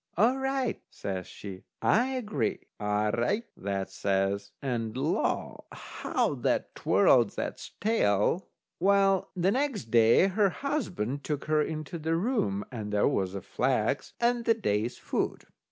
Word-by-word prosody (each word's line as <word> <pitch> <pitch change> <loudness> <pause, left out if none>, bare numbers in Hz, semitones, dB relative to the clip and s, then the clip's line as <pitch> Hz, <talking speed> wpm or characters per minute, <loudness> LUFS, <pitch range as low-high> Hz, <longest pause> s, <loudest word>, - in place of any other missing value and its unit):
"All 235 +7 +4
right," 265 -2 -1
says 95 -2 -5
she, 95 -2 -9 0.2
"I 240 +4 +3
agree." 210 - -2 0.2
"All 105 0 +1
right," 120 - 0
that 100 -1 -3
says, 100 0 0
and 120 -4 -2
law! 150 +6 -1
how - - -2
that - - -1
twirled - - +4
that's - - -4
tail. 175 - +2 0.3
Well, 195 +1 +3
the 185 +1 +2
next 255 - -1
day, 115 +7 +6
her 195 +1 +3
husband 180 - -2
took 150 -2 -3
her 155 0 +2
into 155 +2 -4
the 160 +1 0
room, 165 - 0
and 110 -4 -5
there 105 0 +3
was 95 -1 0
the 100 -1 -5
flax 125 +4 0
and 240 0 +2
the 230 - +4
day's 115 - -1
food. - - -2
145 Hz, 140 wpm, -29 LUFS, -, 0.3 s, day